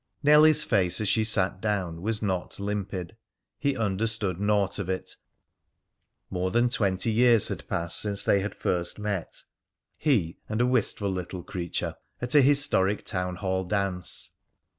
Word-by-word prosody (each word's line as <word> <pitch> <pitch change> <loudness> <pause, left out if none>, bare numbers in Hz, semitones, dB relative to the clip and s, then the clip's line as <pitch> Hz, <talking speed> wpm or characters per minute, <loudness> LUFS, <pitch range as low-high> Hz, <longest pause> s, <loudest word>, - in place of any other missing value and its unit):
Nellie's 150 +1 +6
face 100 - +3
as 110 - -1
she 110 +3 +2
sat 95 -3 +1
down 95 -6 -2
was 110 +2 -1
not 95 -2 -2
limpid. 100 -2 -4 0.4
He 140 -2 0
understood 105 -3 0
naught 100 -1 +1
of 95 -2 -4
it. 95 0 -3 1.2
More 90 +1 -1
than 120 +5 +2
twenty 100 -3 0
years 115 -1 +4
had - - -6
passed 85 0 -3
since 100 -2 -2
they 100 - +3
had 100 +2 -4
first 85 -1 -2
met 105 -4 -4 0.6
he 105 - +1
and 110 +1 -2
a 120 - +3
wistful 110 -5 0
little 90 -1 -5
creature 85 -1 -4 0.2
at 125 +3 -2
a 145 - +7
historic 130 -8 +3
town 90 -1 -3
hall 95 0 -2
dance. 95 -2 -2
100 Hz, 150 wpm, -27 LUFS, 95-115 Hz, 1.2 s, a